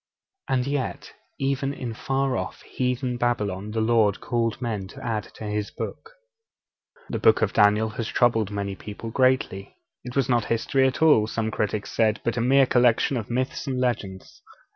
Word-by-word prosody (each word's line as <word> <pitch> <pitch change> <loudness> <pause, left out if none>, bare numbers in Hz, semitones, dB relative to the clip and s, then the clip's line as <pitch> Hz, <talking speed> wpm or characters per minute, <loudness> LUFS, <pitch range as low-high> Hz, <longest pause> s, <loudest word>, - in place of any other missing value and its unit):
And 125 -2 +1
yet, 140 -1 -3 0.2
even 135 +1 -1
in 120 -4 -5
far 135 +3 -1
off - - -5
heathen 125 -1 -2
Babylon 105 -5 -1
the 110 +1 -1
Lord 110 -3 +3
called 115 -2 -1
men 110 -6 -3
to - - -11
add 110 -3 -1
to - - -9
His 105 0 -2
Book. 455 +2 -7 1.0
The - - -2
Book - - +4
of - - 0
Daniel 105 +2 +4
has 110 +1 -4
troubled 115 -5 +2
many 100 -1 -3
people 105 +4 -8
greatly. 130 -6 +1 0.3
It 125 0 -8
was 135 -3 +2
not 120 -3 +2
history 130 +4 +2
at 130 +4 -1
all, 145 -9 +5
some 110 0 -2
critics 105 -1 -2
said, 110 -1 +2
but 115 - -1
a 120 - 0
mere 135 +3 +5
collection 125 +1 +3
of 115 -4 -4
myths 130 +4 -2
and 130 -2 -1
legends. 120 - -3
120 Hz, 175 wpm, -25 LUFS, 105-130 Hz, 1.0 s, all